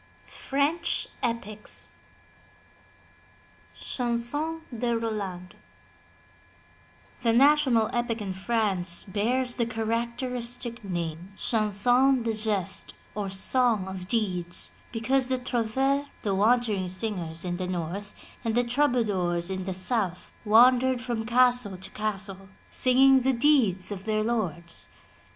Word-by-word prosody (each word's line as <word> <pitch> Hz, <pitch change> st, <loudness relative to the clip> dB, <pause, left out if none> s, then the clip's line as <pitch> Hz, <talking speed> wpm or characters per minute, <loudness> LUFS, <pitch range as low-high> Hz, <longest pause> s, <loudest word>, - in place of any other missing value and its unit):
^FRENCH 280 Hz, -, -1 dB, 0.2 s
EPICS 215 Hz, -3 st, -4 dB, 1.9 s
CHANSON 255 Hz, +7 st, -2 dB
DE 235 Hz, 0 st, 0 dB
ROLAND 200 Hz, -5 st, -4 dB, 1.7 s
The 235 Hz, -2 st, +2 dB
national 260 Hz, -3 st, +4 dB
epic 240 Hz, -1 st, -1 dB
in 200 Hz, -3 st, -4 dB
France 190 Hz, -4 st, 0 dB
bears 240 Hz, +5 st, -1 dB
the 235 Hz, -2 st, +1 dB
characteristic 235 Hz, +1 st, -3 dB
name. 175 Hz, 0 st, -5 dB
Chanson 245 Hz, +4 st, +2 dB
de 230 Hz, -, 0 dB
GestCy 215 Hz, -4 st, -1 dB, 0.2 s
or 205 Hz, -1 st, -3 dB
Song 215 Hz, +1 st, +1 dB
of 190 Hz, -1 st, -7 dB
Deeds, 185 Hz, -6 st, +1 dB, 0.2 s
because 255 Hz, +3 st, 0 dB
the 260 Hz, -, +1 dB
irouvereSy 265 Hz, +4 st, 0 dB, 0.2 s
the 200 Hz, -, 0 dB
wandering 210 Hz, -2 st, +2 dB
singers 180 Hz, -4 st, -3 dB
in 175 Hz, -1 st, -2 dB
the 185 Hz, 0 st, -3 dB
north, 185 Hz, +3 st, -4 dB, 0.3 s
and 225 Hz, -2 st, -1 dB
the 245 Hz, -, +3 dB
troubadours 215 Hz, -10 st, +1 dB
in 190 Hz, -1 st, -4 dB
the 190 Hz, -, -3 dB
south, 185 Hz, -2 st, 0 dB
wandered 245 Hz, +3 st, +5 dB
from 240 Hz, -2 st, -3 dB
castle 245 Hz, -5 st, +3 dB
to 185 Hz, -, -9 dB
castle 195 Hz, -2 st, -3 dB, 0.2 s
singing 265 Hz, +1 st, +5 dB
the 260 Hz, +1 st, +1 dB
deeds 235 Hz, -9 st, +3 dB
of 195 Hz, -1 st, -6 dB
their 215 Hz, -1 st, 0 dB
lords. 175 Hz, -7 st, -2 dB
225 Hz, 110 wpm, -27 LUFS, 190-245 Hz, 1.9 s, wandered